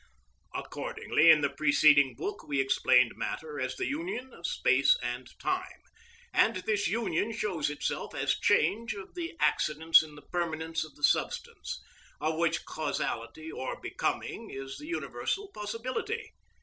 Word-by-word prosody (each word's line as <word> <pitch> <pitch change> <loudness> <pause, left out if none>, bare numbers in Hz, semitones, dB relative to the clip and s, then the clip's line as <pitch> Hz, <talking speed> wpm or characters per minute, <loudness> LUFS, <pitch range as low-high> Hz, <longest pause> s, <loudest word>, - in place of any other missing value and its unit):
Accordingly, 160 +2 +1
in 155 -2 +8
the - - +1
preceding 145 -2 +5
book 405 +1 -5
we 140 -1 0
explained 135 0 +4
matter 455 -1 -4
as - - -2
the 375 - -2
union 290 -4 -4
of 170 - -5
space 135 +2 +4
and 120 +1 -3
time, 375 0 -3 0.5
and 365 - +4
this 205 +2 0
union 210 -2 0
shows 195 -9 -1
itself 150 - -3
as - - +1
change 205 +9 +2
of 195 -1 -9
the 345 -1 -5
accidents 160 +2 +4
in 155 -2 -10
the 150 - -13
permanence 160 -2 -2
of 155 -2 -12
the 145 - -18
substance, - - 0 0.4
of 155 +2 0
which 170 0 +1
causality 145 -1 -3
or 130 - -5
becoming - - -3
is 135 0 -7
the 300 - -9
universal 390 +3 -3
possibility. 255 - -4
170 Hz, 145 wpm, -30 LUFS, -, 0.5 s, in